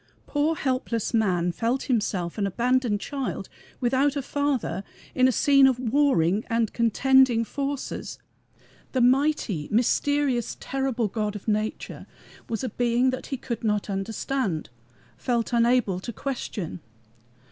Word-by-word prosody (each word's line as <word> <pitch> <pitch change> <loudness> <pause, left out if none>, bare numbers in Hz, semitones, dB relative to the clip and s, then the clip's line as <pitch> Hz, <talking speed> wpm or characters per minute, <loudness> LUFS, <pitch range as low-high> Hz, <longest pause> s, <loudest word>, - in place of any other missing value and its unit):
Poor 300 +2 0
helpless 255 -6 -1
man 180 -6 +2
felt 235 +8 -1
himself 205 -7 -1
an 200 - +1
abandoned 240 +1 +1
child, 275 +3 -4 0.3
without 265 +3 +2
a 280 - -2
Father, 265 - -1 0.3
in 255 0 +4
a - - +3
scene 275 +2 +5
of 260 -2 +2
warring 230 - +2
and 230 -2 0
contending 245 +1 +4
forces. 280 +2 -4 0.8
The 260 - +2
mighty, 250 - +2
mysterious, 250 +2 +1
terrible 265 -4 -1
God 210 0 -2
of 205 - -8
nature 215 0 -2 0.4
was 225 +2 -2
a 255 - -1
being 245 +3 +2
that 255 - -5
he 270 - -3
could 235 -2 -5
not 210 -2 0
understand, 195 - -2 0.5
felt 240 -1 -1
unable 235 -5 +3
to 235 - -6
question. 225 - -5
240 Hz, 130 wpm, -25 LUFS, 210-265 Hz, 0.8 s, scene